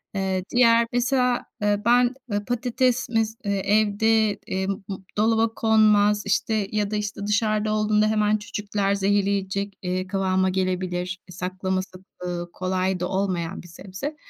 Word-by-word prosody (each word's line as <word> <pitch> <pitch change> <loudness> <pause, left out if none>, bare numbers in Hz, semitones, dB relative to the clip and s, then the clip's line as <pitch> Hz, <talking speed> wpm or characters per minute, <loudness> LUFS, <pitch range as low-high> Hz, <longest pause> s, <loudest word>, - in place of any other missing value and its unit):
Eee, 190 -1 -1
diğer 235 -1 +4
mesela, 250 0 +1 0.2
eee, 205 0 +1
ben, 245 +1 +4 0.2
ııı, 205 0 -1
patates 245 +1 0
mes 225 -1 0
eee, 200 -1 0 0.2
evde, 220 +1 +2 0.2
emm, 190 +1 -1 0.2
m 195 - -2 0.2
dolaba 225 +1 +2
konmaz, 210 -2 +4
işte, 205 +1 0
ya 210 -1 -1
da, - - -1
işte, 210 -1 -3
dışarıda 215 0 +1
olduğunda 215 0 +2
hemen 215 0 +2
cücükler 205 -2 -2
zehirleyecek, 200 0 0
eee, 185 0 -2
kıvama 190 -1 +1
gelebilir. 185 0 -2
E, - - -13
saklaması, 185 +1 -4 0.2
ııı, 175 -1 -4
kolay 185 0 -1
da 180 - -1
olmayan 185 -2 -2
bir - - -13
sebze. 190 - -7
205 Hz, 145 wpm, -24 LUFS, 190-220 Hz, 0.2 s, diğer